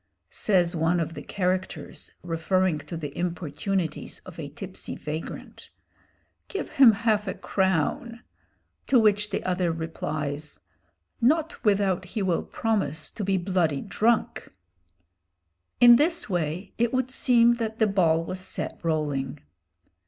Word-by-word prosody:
Says 180 -4 +2
one 165 +2 +2
of 165 0 -2
the - - -7
characters, 185 -1 -3
referring 175 0 +1
to 150 +3 -7
the 145 -3 -6
importunities 175 0 -2
of 180 -3 -11
a 145 -3 -5
tipsy 185 +6 -6
vagrant, 155 +2 -7 0.8
"Give 395 - -4
him 265 -4 +7
half 210 -1 +1
a 190 - -2
crown!" 190 +5 -1 0.7
to 265 - +4
which 210 -2 +3
the - - -3
other 180 -2 0
replies, 155 -2 -4 0.6
"Not 320 +7 +1
without 195 -3 +2
he 205 +3 -3
will 180 -3 +1
promise 200 -9 -1
to 215 - -5
be 195 0 +1
bloody 175 -6 0
drunk!" 220 +4 0 1.3
In 240 -1 +9
this 330 +5 +1
way 175 +1 -2
it 235 0 +2
would 255 0 0
seem 240 -2 +4
that 220 -1 -2
the 220 - +4
ball 170 -5 +2
was 185 +2 -4
set 185 - -3
rolling. 150 -4 -1
185 Hz, 130 wpm, -26 LUFS, 160-215 Hz, 1.3 s, In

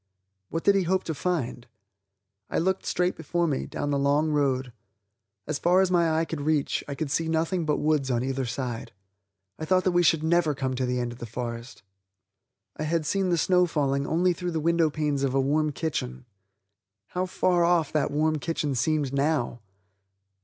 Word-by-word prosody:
What 165 - -3
did 200 - +5
he 195 - +3
hope 185 +1 +1
to 160 - -3
find? 140 -6 -2 0.8
I - - -2
looked 190 +3 0
straight 180 +1 +1
before 170 +2 -1
me, 145 -5 -1
down 145 - -3
the 140 - +1
long 145 +3 +2
road. 135 -4 0 0.7
As 150 -1 -3
far 180 +2 +4
as 190 -1 +2
my 170 -2 +3
eye 165 - +1
could 160 -3 -5
reach, 150 -1 0
I 140 - -4
could 150 -1 -3
see 165 +2 0
nothing 165 +1 0
but 150 - +2
woods 150 -3 +1
on 120 -1 0
either 135 -1 -2
side. 120 -2 -4 0.7
I 155 - -3
thought 185 +2 +2
we 175 - +4
should 165 -2 +3
never 160 -2 +2
come 135 -1 -2
to 130 0 -1
the 125 0 -1
end 120 -1 -2
of 120 - -11
that 120 - -7
forest. 120 -1 -6 0.9
I - - -6
had 155 +1 0
seen 195 +2 0
the 175 - +2
snow 180 +2 +3
falling 140 -3 0
only 175 +3 +2
through 175 0 -4
the 160 - 0
window 165 0 +2
panes 150 -2 -1
of 135 -1 0
a - - +3
warm 150 +3 +1
kitchen. 135 - -4 0.8
How 185 +1 -2
far 180 -1 +2
off 170 -3 +2
that 150 -2 +1
warm 155 +1 +1
kitchen 150 -3 -2
seemed 145 +1 0
now! 140 -4 0
155 Hz, 195 wpm, -26 LUFS, 135-170 Hz, 0.9 s, did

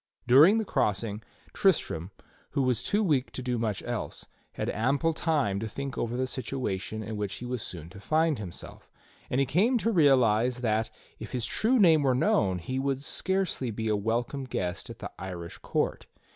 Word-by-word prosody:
Dur 130 +5 +8
ing 205 +5 +5
the 220 - 0
crossing, 105 - -1 0.3
Tristram, 95 - +1 0.4
who 140 - +1
was 125 -2 +1
too 210 - +1
weak 145 -8 +1
to 130 - -5
do 125 -2 -1
much 110 -4 -2
else, - - -4 0.3
had - - -3
ample 140 +9 +1
time 150 - 0
to 110 - -3
think 140 +4 -5
over 120 +1 -2
the 130 - +1
situation 110 -5 -3
in 110 +1 -5
which 105 -2 -3
he 125 - -7
was 125 -2 -3
soon 85 -5 -7
to 95 - -11
find 155 +4 +1
himself; 95 -5 -9 0.4
and 125 - 0
he 135 - +3
came 210 - +3
to 230 0 0
realize 125 - +4
that, 110 -1 +1 0.3
if 110 - -8
his 125 -3 -1
true 230 - +2
name 165 -8 +6
were 130 -3 +2
known, 100 -7 +2
he 130 +10 -3
would 135 0 0
scarcely 185 -1 0
be 110 0 -3
a 105 - +2
welcome 120 +6 -1
guest 90 -7 -3
at - - -8
the - - -7
Irish 90 -3 -7
court. - - -2
125 Hz, 190 wpm, -28 LUFS, 105-145 Hz, 0.4 s, Dur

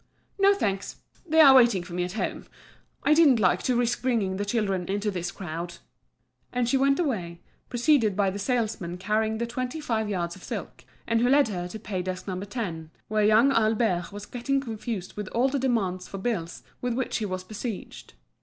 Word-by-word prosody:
"No, 395 +1 +5
thanks; 195 - -2 0.3
they 320 0 +3
are 275 -3 +9
waiting 235 -8 +5
for 175 - -10
me 180 0 0
at 180 +1 -4
home. 220 - -3 0.6
I 300 - +5
didn't 300 -7 +6
like 185 -2 +3
to 250 - +1
risk 240 -1 +1
bringing 220 -7 0
the 205 - -2
children 200 -4 -1
into 205 +2 0
this 175 -2 -3
crowd." 175 -2 -6 0.8
And 245 -1 0
she 270 - +2
went 275 +1 +3
away, 185 - -2 0.3
preceded 240 -4 +3
by 195 -1 +2
the 200 - -5
salesman 210 -6 -1
carrying 215 +3 0
the 235 - -1
twenty 250 +5 -4
five 225 -7 -1
yards 175 -4 -2
of 190 - -14
silk, - - -6 0.2
and 230 0 +1
who 245 - +3
led 280 -2 +5
her 180 -3 -3
to 200 - -7
pay 200 -3 -4
desk 185 +1 -5
No. 185 -1 -3
10, 190 -6 -5 0.2
where 215 0 +2
young 220 +6 +5
Albert 215 -7 +1
was 205 0 -8
getting 265 +4 -1
confused 225 -6 -5
with 210 -2 -5
all 245 +6 +1
the 280 +1 -1
demands 200 -8 0
for 195 - -7
bills 190 -5 -3 0.2
with 245 -1 -1
which 260 0 -1
he 220 - -2
was 185 -1 -4
besieged. 215 +2 -7
215 Hz, 200 wpm, -26 LUFS, 185-245 Hz, 0.8 s, are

